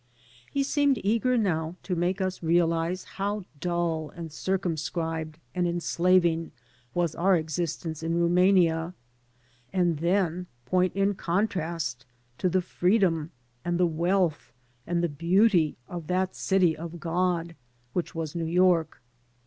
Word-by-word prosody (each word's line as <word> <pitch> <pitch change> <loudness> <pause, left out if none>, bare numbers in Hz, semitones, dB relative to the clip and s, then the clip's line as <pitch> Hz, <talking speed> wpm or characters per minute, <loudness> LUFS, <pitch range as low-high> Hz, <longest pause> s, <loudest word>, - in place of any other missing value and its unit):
He 280 - +1
seemed 285 -1 +2
eager 230 +5 +2
now 165 -6 0
to 180 - -2
make 180 +3 0
us 185 0 -2
realize 170 +1 +1
how 200 0 -3
duU 170 -2 -1
and 165 -2 -7
circumscribed 160 -3 -2 0.2
and 180 -1 +1
enslaving 170 -1 +2 0.4
was 170 -3 +1
our 185 +2 +3
existence 160 0 -3
in 165 +1 -1
Rumania, 175 -1 +3 0.8
and 175 -4 +1
then 180 0 0 0.2
point 185 +5 +1
in 195 +1 +2
contrast 170 - -2 0.3
to 185 - +2
the 185 +1 +1
freedom 180 -4 +1 0.3
and 175 0 -1
the 180 - +5
wealth 170 -1 0 0.4
and 175 0 0
the - - +3
beauty 170 +2 +3
of 170 -3 -7
that 185 +1 0
City 185 -4 +2
of 170 +1 -7
God 170 0 -1 0.4
which 175 - -3
was 160 -2 -3
New 165 -1 -2
York. 170 -3 +2
175 Hz, 130 wpm, -27 LUFS, 165-185 Hz, 0.8 s, the